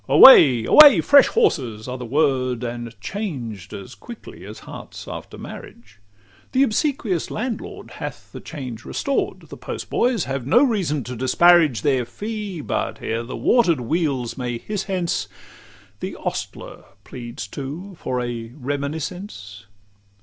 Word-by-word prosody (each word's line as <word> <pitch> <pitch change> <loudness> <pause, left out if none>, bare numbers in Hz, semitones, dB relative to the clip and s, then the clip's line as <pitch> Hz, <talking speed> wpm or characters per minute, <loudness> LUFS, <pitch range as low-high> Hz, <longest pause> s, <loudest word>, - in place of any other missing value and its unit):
Away! 130 - +9
away! 300 -2 +9
"Fresh 280 -1 +6
horses!" 125 - 0
are 125 0 -5
the 125 - -6
word, 130 -3 +1
And 120 -2 -6
changed 120 - -5
as 100 +6 -9
quickly 220 - -11
as - - -10
hearts - - -10
after - - -8
marriage; 235 - -11 0.5
The 265 - +4
obsequious 225 - -1
landlord 230 +1 -5
hath - - -8
the - - -8
change 130 -7 -8
restored; 275 - -2
The - - -9
postboys 240 -7 -1
have 135 -2 -4
no 245 - +5
reason 185 - 0
to 125 +2 -6
disparage 150 +2 +4
Their 135 -4 +2
fee; 205 - -6
but 115 -5 -3
ere 115 +1 -2
the 120 +2 -7
water'd 175 - +3
wheels 135 -3 -1
may 120 -1 -3
hiss 200 - -4
hence, 185 -3 -2 0.7
The - - -5
ostler - - -6 0.2
pleads 120 -3 -8
too 150 - -7
for 125 - -2
a 120 -1 -5
reminiscence. 140 - -5
140 Hz, 135 wpm, -22 LUFS, 120-200 Hz, 0.7 s, Away